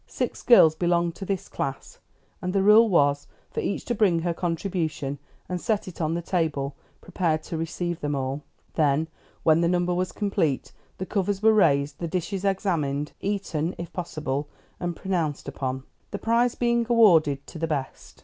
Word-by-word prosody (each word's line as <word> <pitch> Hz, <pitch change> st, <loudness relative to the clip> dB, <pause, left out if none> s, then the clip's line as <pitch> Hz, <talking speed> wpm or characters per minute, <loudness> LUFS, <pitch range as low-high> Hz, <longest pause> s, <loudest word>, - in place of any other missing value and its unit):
Six -, -, -3 dB
girls 170 Hz, -, +7 dB
belonged 170 Hz, 0 st, +1 dB
to 195 Hz, -, -6 dB
this 195 Hz, -1 st, -2 dB
class, 135 Hz, 0 st, -5 dB, 0.4 s
and 180 Hz, 0 st, -2 dB
the 195 Hz, -1 st, +2 dB
rule 215 Hz, +3 st, +7 dB
was 145 Hz, -5 st, +2 dB, 0.2 s
for -, -, -3 dB
each -, -, -2 dB
to 240 Hz, -, -1 dB
bring 200 Hz, -6 st, +3 dB
her 170 Hz, -1 st, 0 dB
contribution 165 Hz, -5 st, -2 dB, 0.3 s
and 180 Hz, -1 st, -3 dB
set 220 Hz, -5 st, -1 dB
it 180 Hz, -2 st, -7 dB
on 160 Hz, +1 st, 0 dB
the 170 Hz, -, -3 dB
table 150 Hz, -6 st, -1 dB, 0.3 s
prepared 165 Hz, -4 st, -1 dB
to 165 Hz, -, -5 dB
receive 170 Hz, +1 st, -3 dB
them 145 Hz, 0 st, -2 dB
all; 135 Hz, +1 st, -2 dB, 0.3 s
then, 155 Hz, +1 st, +2 dB, 0.3 s
when 160 Hz, +1 st, +4 dB
the 170 Hz, -, +3 dB
number 180 Hz, 0 st, +1 dB
was 180 Hz, +1 st, -1 dB
complete, 165 Hz, -9 st, -1 dB, 0.3 s
the 185 Hz, -, -4 dB
covers 200 Hz, +1 st, -1 dB
were 220 Hz, 0 st, +6 dB
raised, 145 Hz, -8 st, +3 dB
the 170 Hz, -, -2 dB
dishes 185 Hz, +3 st, -3 dB
examined, 165 Hz, -8 st, 0 dB
eaten 190 Hz, -5 st, -2 dB
(if 170 Hz, -, -7 dB
possible), 150 Hz, -5 st, -3 dB, 0.3 s
and 175 Hz, -1 st, -3 dB
pronounced 165 Hz, -8 st, -2 dB
upon, 130 Hz, -1 st, -3 dB, 0.3 s
the -, -, -4 dB
prize 235 Hz, +2 st, +2 dB
being 235 Hz, -1 st, +2 dB
awarded 165 Hz, -, +5 dB
to 160 Hz, -, -10 dB
the 165 Hz, -, -1 dB
best. 140 Hz, -4 st, -5 dB
170 Hz, 175 wpm, -25 LUFS, 150-195 Hz, 0.4 s, girls